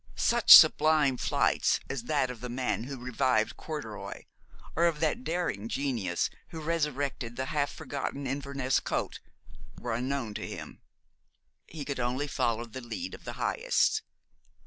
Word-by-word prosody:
Such - - +9
sublime 150 -4 +4
flights - - +2
as 130 -3 -4
that 145 -4 +1
of 120 -3 -10
the 125 - -5
man 125 -2 -2
who 135 +1 -6
revived 125 -2 0
corduroy, 145 -10 -7 0.5
or 170 - +3
of 160 -3 -1
that 165 +11 0
daring 160 - -2
genius 115 -12 -1 0.2
who 160 - -7
resuscitated 145 -6 -2
the 130 - -2
half 145 -1 0
forgotten 140 0 -5
Inverness 135 -1 -1
coat, - - -3 0.6
were 120 -1 -3
unknown 125 -1 -2
to - - -5
him. - - -8 0.9
He 150 -3 -7
could 140 -2 -4
only 125 +4 -1
follow 120 -5 -1
the 120 +3 -8
lead 260 - -6
of - - -11
the - - -5
highest. 485 -2 +1
135 Hz, 145 wpm, -29 LUFS, 120-150 Hz, 0.9 s, Such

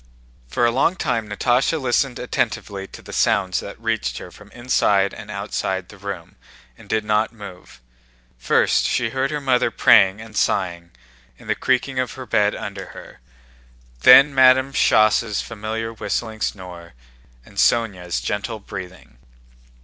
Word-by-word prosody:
For 120 - 0
a 120 - +3
long 135 +9 +1
time 115 - -2
Natásha 125 +9 +1
listened 130 -1 0
attentively 95 -1 -3
to - - -13
the - - -11
sounds 95 -1 +1
that 100 - -9
reached 110 - -2
her - - -9
from - - -16
inside 105 -5 +1
and 105 -2 -10
outside 95 -2 -3
the 105 - -13
room 100 -4 -7 0.4
and - - -17
did 110 -1 0
not 105 +1 +1
move. 100 - -12 0.6
First - - +2
she 115 -2 -1
heard 130 +2 -1
her 150 0 -3
mother 130 -4 +1
praying 100 -3 +4
and 110 -1 -12
sighing 85 -4 -1 0.5
and - - -16
the - - +1
creaking 130 +1 -1
of 125 -2 -2
her 130 - -8
bed 105 -2 +1
under 100 -2 -7
her, - - -12 0.8
then 135 - +8
Madame 130 +1 +5
Schoss' 110 -2 +3
familiar 110 +1 -5
whistling 110 0 -4
snore 90 -6 -6 0.5
and - - -18
Sónya's 95 -7 +1
gentle 110 +2 -3
breathing. 95 - -10
110 Hz, 150 wpm, -21 LUFS, 95-120 Hz, 0.8 s, then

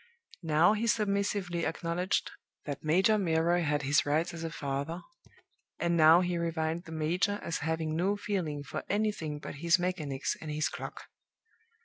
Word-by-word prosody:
Now 165 +4 +4
he 220 +2 -1
submissively 200 -5 0
acknowledged 170 +3 -1 0.3
that 145 -2 -5
Major 190 +7 +3
Milroy 170 -1 +2
had 150 -2 0
his 145 +2 +3
rights 155 +4 0
as 165 -1 -6
a 165 - -2
father, 145 +3 -4 0.7
and 170 0 +1
now 160 +1 +7
he 175 -1 -1
reviled 165 0 -2
the 165 - -10
major 175 +6 0
as 165 - -2
having 160 0 -1
no 190 +5 +1
feeling 175 -9 -2
for - - -5
anything 205 -8 -1
but 145 - -8
his 170 +1 +4
mechanics 155 -7 -2
and 155 - -6
his 150 0 0
clock. - - -7
165 Hz, 155 wpm, -30 LUFS, 155-185 Hz, 0.7 s, now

